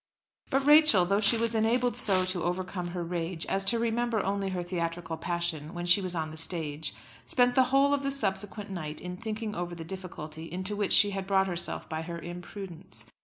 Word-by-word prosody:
But 270 -1 +1
Rachel, 295 - +7
though 200 +3 +2
she 215 +2 +5
was 230 0 0
enabled 235 +2 +1
so 195 -6 +2
to 185 -1 -1
overcome 180 0 -3
her 175 0 -4
rage 170 0 -3
as 195 0 0
to 235 +4 +3
remember 235 0 0
only 195 0 -1
her 180 -2 -3
theatrical 170 -1 -3
passion 170 -1 -3
when 175 0 -4
she 175 +3 +5
was 185 -2 -3
on 160 -1 -2
the 160 - -8
stage, 160 -2 -3 0.3
spent 245 -1 +3
the 260 0 +5
whole 275 +2 +3
of 285 - +1
the 275 - -1
subsequent 205 -4 -2
night 155 -5 -5
in 180 0 -6
thinking 220 +1 -4
over 175 -2 -4
the 165 -1 -8
difficulty 165 -3 -7
into 185 +3 -1
which 205 -1 0
she 205 -1 +6
had 195 -1 -4
brought 195 -1 +3
herself 175 -3 -2
by 160 0 -4
her 170 +1 -6
imprudence. 175 - -9
185 Hz, 205 wpm, -29 LUFS, 170-215 Hz, 0.3 s, Rachel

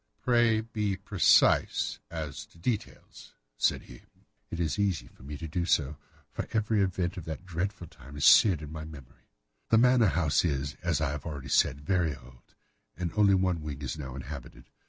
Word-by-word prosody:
"Pray 120 -3 +3
be 105 -3 -2
precise 95 -3 +3
as 80 -4 -6
to - - -22
details," 105 +5 -5 0.2
said - - +1
he. - - -14 0.5
"It 85 - -5
is 85 +3 -1
easy 100 -6 0
for - - -20
me 70 +2 -7
to 80 - -6
be 85 +3 -2
so, 75 -4 +1 0.4
for - - -5
every 110 -1 +1
event 95 -1 -1
of 85 - -7
that 80 +3 -6
dreadful 90 +2 -3
time 70 -2 -13
is 70 - 0
seared 95 -9 +7
into 75 +1 -8
my 80 -1 -6
memory. 75 -5 -13 0.4
The 115 - +5
manor 125 -1 +5
house 80 -4 +2
is, 70 -3 -1
as 85 -4 0
I 75 -2 0
have 75 +2 -6
already 70 -4 -6
said, 70 +1 +2
very 90 -4 +1
old, 60 -1 -18 0.4
and 90 -2 -3
only 100 -2 +5
one 90 -3 +1
wing 75 -2 -6
is 65 - -3
now 65 -4 -7
inhabited. 70 0 -9
85 Hz, 185 wpm, -29 LUFS, 75-100 Hz, 0.5 s, seared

